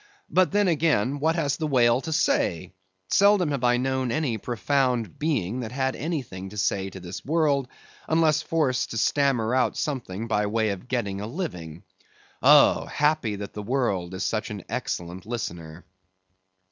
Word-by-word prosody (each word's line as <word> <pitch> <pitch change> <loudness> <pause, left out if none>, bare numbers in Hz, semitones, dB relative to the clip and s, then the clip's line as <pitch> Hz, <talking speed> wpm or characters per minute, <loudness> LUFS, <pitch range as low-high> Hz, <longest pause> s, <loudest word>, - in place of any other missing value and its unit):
But 185 0 +3
then 205 0 +2
again, 145 - +1
what 160 +3 +1
has 145 -5 0
the 155 - -2
whale 125 -3 +3
to 160 - -5
say? 95 - 0 0.4
Seldom 200 -5 +4
have 140 -3 -2
I 120 0 +4
known 130 -1 -1
any 130 -6 -1
profound 120 - -1
being 130 - -1
that 115 -2 -5
had 130 0 -1
anything 125 - -4
to 105 - -10
say 95 -1 0
to 95 - -10
this 90 0 -8
world, 145 -4 +1 0.4
unless 160 -1 +3
forced 145 -7 0
to 115 - -5
stammer 125 -2 +1
out 130 0 +1
something 115 -7 -3
by 105 -2 +1
way 110 +1 0
of 100 +4 -5
getting 100 -6 -2
a 105 - -4
living. 90 - -6 0.6
Oh! - - +6
happy 150 -8 +1
that 100 0 -7
the 105 - -5
world 100 -7 -1
is 95 - -3
such - - -2
an - - -6
excellent 90 +3 -4
listener! 85 -7 -6
125 Hz, 165 wpm, -25 LUFS, 100-150 Hz, 0.6 s, Oh